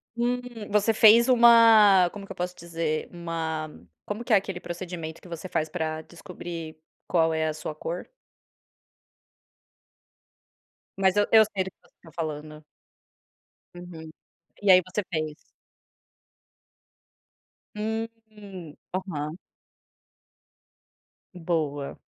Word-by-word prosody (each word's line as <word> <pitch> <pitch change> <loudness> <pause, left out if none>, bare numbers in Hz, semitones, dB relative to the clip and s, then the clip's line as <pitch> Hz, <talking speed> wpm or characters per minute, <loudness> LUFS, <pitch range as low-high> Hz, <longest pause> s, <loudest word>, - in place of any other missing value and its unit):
Hum, 245 +1 0 0.3
você 210 +2 +2
fez 225 +3 +7
uma 225 -6 +7
Como 205 -1 -8
que - - -12
eu - - -7
posso 180 0 -4
dizer? 165 -2 -3
Uma 165 -2 -4 0.4
como 210 +3 -5
que 240 - -6
é - - +7
aquele 195 -2 -1
procedimento 175 -2 -7
que - - -14
você 170 +2 -6
faz 155 0 -1
pra 155 0 -3
descobrir 170 -2 -9 0.3
qual 165 -2 +2
é 160 0 0
a 155 - -1
sua 155 0 -6
cor? 165 +3 -5 2.9
Mas 190 0 +3
eu 205 - +4
eu 220 -1 +8
sei 195 -3 -2
do 190 - -8
que - - -63
você - - -34
tá 165 - -14
falando. 155 -1 -5 1.1
Uhum. 170 -3 -10 0.5
E 200 - +3
aí, 185 0 +9
você 190 +3 -2
fez. 155 -1 -2 2.4
Uhum. 215 -6 -6 0.2
Aham. 165 -5 -4 2.0
Boa. 155 -5 -2
175 Hz, 115 wpm, -26 LUFS, 160-205 Hz, 2.9 s, aí